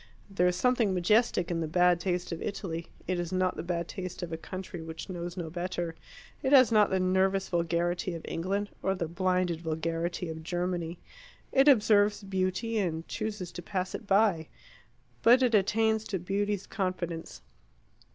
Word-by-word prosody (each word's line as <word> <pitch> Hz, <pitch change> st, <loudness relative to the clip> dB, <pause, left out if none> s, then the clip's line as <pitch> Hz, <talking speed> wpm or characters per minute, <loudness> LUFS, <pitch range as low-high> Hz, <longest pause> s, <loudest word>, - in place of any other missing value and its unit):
There 180 Hz, -2 st, +2 dB
is 180 Hz, -, +1 dB
something 230 Hz, -1 st, +2 dB
majestic 180 Hz, -1 st, +2 dB
in 170 Hz, -, 0 dB
the 160 Hz, -, -1 dB
bad 180 Hz, +2 st, +3 dB
taste 180 Hz, 0 st, -2 dB
of 165 Hz, -, -4 dB
Italy; 170 Hz, -5 st, -4 dB, 0.2 s
it 180 Hz, 0 st, -1 dB
is 175 Hz, -1 st, -3 dB
not 185 Hz, 0 st, +1 dB
the -, -, -4 dB
bad 170 Hz, -1 st, -2 dB
taste 185 Hz, -2 st, -6 dB
of 170 Hz, -2 st, -5 dB
a -, -, 0 dB
country 185 Hz, +1 st, -7 dB
which 160 Hz, +3 st, -7 dB
knows 175 Hz, 0 st, -5 dB
no 165 Hz, -3 st, -4 dB
better; 175 Hz, -1 st, -3 dB, 0.5 s
it 265 Hz, -, 0 dB
has 255 Hz, -5 st, +7 dB
not 210 Hz, -2 st, +5 dB
the 190 Hz, -, +1 dB
nervous 190 Hz, +1 st, +2 dB
vulgarity 175 Hz, +1 st, 0 dB
of 165 Hz, -, -8 dB
England, 195 Hz, +4 st, -2 dB
or 190 Hz, 0 st, 0 dB
the 170 Hz, -3 st, -2 dB
blinded 180 Hz, -1 st, 0 dB
vulgarity 165 Hz, +2 st, -2 dB
of 160 Hz, 0 st, -6 dB
Germany. 175 Hz, 0 st, -2 dB, 0.5 s
It 270 Hz, +1 st, +4 dB
observes 210 Hz, -5 st, +5 dB
beauty, 195 Hz, +4 st, -1 dB
and 165 Hz, -4 st, -2 dB
chooses 210 Hz, -5 st, -4 dB
to -, -, -7 dB
pass 185 Hz, +1 st, -3 dB
it 215 Hz, -, -6 dB
by. 195 Hz, -6 st, +3 dB, 0.7 s
But 250 Hz, +3 st, +6 dB
it 245 Hz, -2 st, +2 dB
attains 220 Hz, +2 st, +3 dB
to 195 Hz, -, -2 dB
beauty's 200 Hz, +2 st, -1 dB
confidence. 185 Hz, -4 st, -4 dB
185 Hz, 170 wpm, -29 LUFS, 170-200 Hz, 0.7 s, has